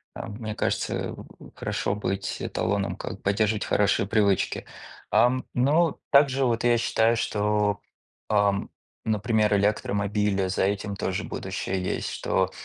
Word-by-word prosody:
а, -, -, -6 dB
мне 110 Hz, 0 st, -6 dB
кажется, -, -, -1 dB
в -, -, -13 dB
хорошо 100 Hz, -, -2 dB
быть 95 Hz, -1 st, -3 dB
эталоном, 100 Hz, -1 st, -1 dB
как -, -, -7 dB
поддерживать 105 Hz, +1 st, +1 dB
хорошие 100 Hz, -1 st, +2 dB
привычки. 100 Hz, -2 st, +1 dB, 0.5 s
Ам, 130 Hz, +1 st, +3 dB
но 150 Hz, +6 st, +2 dB
также 140 Hz, -1 st, +5 dB
вот 115 Hz, -2 st, 0 dB
я 120 Hz, -1 st, +4 dB
считаю, 115 Hz, 0 st, +2 dB
что, 105 Hz, -2 st, 0 dB, 0.5 s
ам, 100 Hz, -1 st, +2 dB, 0.4 s
например, 110 Hz, -1 st, +2 dB
электромобили, 100 Hz, -1 st, 0 dB
за 95 Hz, -, 0 dB
этим 100 Hz, +1 st, -1 dB
тоже 95 Hz, -1 st, -2 dB
будущее 95 Hz, -1 st, -3 dB
есть, -, -, -2 dB
что, -, -, 0 dB
105 Hz, 130 wpm, -26 LUFS, 100-115 Hz, 0.5 s, также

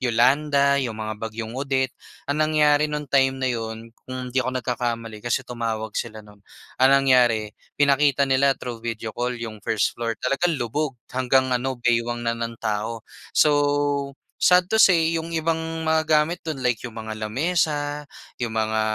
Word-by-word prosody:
Yolanda, 140 Hz, +4 st, +3 dB
'yong 125 Hz, -5 st, -2 dB
mga 110 Hz, 0 st, -4 dB
bagyong 110 Hz, 0 st, -5 dB
Odette. 135 Hz, -1 st, 0 dB, 0.4 s
Ang 145 Hz, -, 0 dB
nangyari 150 Hz, -1 st, +3 dB
no'ng 150 Hz, -2 st, -5 dB
time 135 Hz, -1 st, +3 dB
na 130 Hz, -, +1 dB
'yon, 115 Hz, -1 st, -5 dB, 0.2 s
kung 130 Hz, -1 st, -6 dB
hindi 130 Hz, -, 0 dB
ako 130 Hz, 0 st, -1 dB
nagkakamali 115 Hz, -2 st, -3 dB
kasi 120 Hz, +1 st, -1 dB
tumawag 115 Hz, -3 st, -4 dB
sila 110 Hz, -2 st, -5 dB
no'n. 105 Hz, -1 st, -17 dB, 0.4 s
Ang 130 Hz, +1 st, +5 dB
nangyari, 125 Hz, -6 st, +3 dB, 0.2 s
pinakita 140 Hz, 0 st, +3 dB
nila 135 Hz, +1 st, +3 dB
through 120 Hz, -3 st, -7 dB
video 115 Hz, -1 st, -4 dB
call 125 Hz, +2 st, -2 dB
'yong 115 Hz, -2 st, -7 dB
1st 110 Hz, -2 st, +1 dB
floor, 115 Hz, -1 st, -1 dB
talagang 165 Hz, +5 st, +1 dB
lubog, 135 Hz, +4 st, -2 dB, 0.2 s
hanggang 130 Hz, +1 st, +2 dB
ano 130 Hz, +1 st, 0 dB
baywang 120 Hz, 0 st, +1 dB
na 115 Hz, 0 st, -1 dB
ng 115 Hz, 0 st, -3 dB
tao. 110 Hz, +1 st, -2 dB, 0.3 s
So, 155 Hz, -, +5 dB, 0.9 s
sad 180 Hz, 0 st, +4 dB
to 220 Hz, -, +2 dB
say, 165 Hz, -6 st, +5 dB
'yong 165 Hz, +1 st, -6 dB
ibang 160 Hz, 0 st, -1 dB
mga 160 Hz, -1 st, +1 dB
gamit 155 Hz, +3 st, +2 dB
do'n, 150 Hz, -5 st, -4 dB
like 125 Hz, -3 st, +1 dB
'yong 115 Hz, -, -10 dB
mga 110 Hz, -1 st, -6 dB
lamesa, 150 Hz, +2 st, -1 dB, 0.3 s
'yong 120 Hz, -3 st, -3 dB
mga 110 Hz, 0 st, 0 dB
125 Hz, 165 wpm, -23 LUFS, 115-145 Hz, 0.9 s, Ang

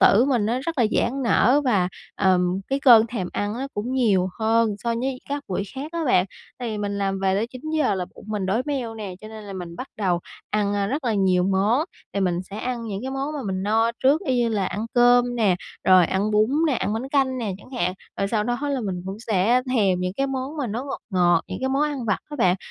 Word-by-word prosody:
tử 225 Hz, +6 st, +6 dB
mình 245 Hz, -7 st, +1 dB
nó 240 Hz, +3 st, 0 dB
rất 320 Hz, +1 st, -4 dB
là 230 Hz, -, +4 dB
giãn 270 Hz, +3 st, 0 dB
nở 255 Hz, +3 st, +4 dB
và, 195 Hz, -8 st, +2 dB, 0.3 s
ờm, 185 Hz, -1 st, +2 dB
cái 275 Hz, +1 st, 0 dB
cơn 230 Hz, -4 st, +7 dB
thèm 205 Hz, -7 st, -4 dB
ăn 205 Hz, +1 st, -2 dB
á, 260 Hz, +3 st, -3 dB
cũng 230 Hz, +5 st, -3 dB
nhiều 200 Hz, -8 st, +2 dB
hơn 225 Hz, -1 st, +2 dB
so 235 Hz, +3 st, -1 dB
với 255 Hz, +2 st, -2 dB
các 285 Hz, 0 st, -3 dB
buổi 190 Hz, +1 st, -1 dB
khác 295 Hz, +5 st, -6 dB
á 335 Hz, -1 st, -2 dB
bạn, 185 Hz, -9 st, +4 dB, 0.3 s
tại 245 Hz, -2 st, -3 dB
vì 210 Hz, -, -3 dB
mình 200 Hz, -1 st, -2 dB
làm 195 Hz, -1 st, -1 dB
về 190 Hz, 0 st, +2 dB
tới 215 Hz, +4 st, 0 dB
9:00 300 Hz, +2 st, -1 dB
là 185 Hz, -1 st, -2 dB
bụng -, -, -13 dB
mình 205 Hz, -3 st, -2 dB
đói 220 Hz, +6 st, +1 dB
meo 260 Hz, -6 st, -2 dB
nè, 205 Hz, -4 st, -6 dB
cho 215 Hz, -, -9 dB
nên 220 Hz, -1 st, -9 dB
là 200 Hz, -, -8 dB
mình 175 Hz, -2 st, -7 dB
bắt 255 Hz, -, -6 dB
đầu 180 Hz, -4 st, 0 dB, 0.3 s
ăn, 205 Hz, -1 st, +1 dB
a, 200 Hz, -1 st, 0 dB
rất 280 Hz, +6 st, -3 dB
là 230 Hz, -3 st, +1 dB
nhiều 185 Hz, -2 st, +3 dB
món, 195 Hz, +7 st, +2 dB, 0.3 s
thì 200 Hz, -, 0 dB
mình 180 Hz, -1 st, 0 dB
sẽ 200 Hz, -, -6 dB
ăn 245 Hz, -1 st, -3 dB
những 200 Hz, -3 st, -4 dB
cái 265 Hz, -, -4 dB
món 270 Hz, +2 st, -3 dB
mà 290 Hz, -, -3 dB
mình 190 Hz, 0 st, -2 dB
no 225 Hz, +3 st, +2 dB
trước, 280 Hz, +5 st, +4 dB
y 260 Hz, -4 st, +1 dB
như 240 Hz, -1 st, +2 dB
là 205 Hz, -4 st, 0 dB
ăn 215 Hz, +4 st, -3 dB
cơm 245 Hz, 0 st, +4 dB
nè, 200 Hz, -6 st, +3 dB, 0.3 s
rồi 185 Hz, -2 st, +6 dB
ăn 200 Hz, +3 st, 0 dB
bún 215 Hz, +2 st, +3 dB, 0.2 s
nè, 300 Hz, -, +2 dB
ăn 205 Hz, -1 st, -1 dB
bánh 240 Hz, +5 st, -3 dB
canh 265 Hz, -2 st, +1 dB
nè 215 Hz, -5 st, -2 dB
chẳng 230 Hz, -, -16 dB
hạn, 180 Hz, -8 st, -1 dB, 0.2 s
rồi 195 Hz, -, 0 dB
sau 210 Hz, -1 st, 0 dB
đó 240 Hz, +1 st, -1 dB
là 275 Hz, -3 st, -1 dB
mình 185 Hz, -4 st, -3 dB
cũng 195 Hz, -, -4 dB
sẽ 225 Hz, +5 st, +3 dB
thèm 195 Hz, -5 st, +2 dB
những 180 Hz, 0 st, -1 dB
cái 275 Hz, -, +1 dB
món 270 Hz, +3 st, -4 dB
mà 280 Hz, -, -2 dB
nó 235 Hz, +5 st, -3 dB
ngọt 275 Hz, -, -5 dB
ngọt, 175 Hz, -2 st, +3 dB
những -, -, -5 dB
cái 265 Hz, -, 0 dB
món 275 Hz, +2 st, +1 dB
ăn 290 Hz, -4 st, -1 dB
vặt 210 Hz, -, +1 dB
á 295 Hz, -, -5 dB
bạn, 185 Hz, -6 st, +3 dB
220 Hz, 260 wpm, -23 LUFS, 195-255 Hz, 0.3 s, cơn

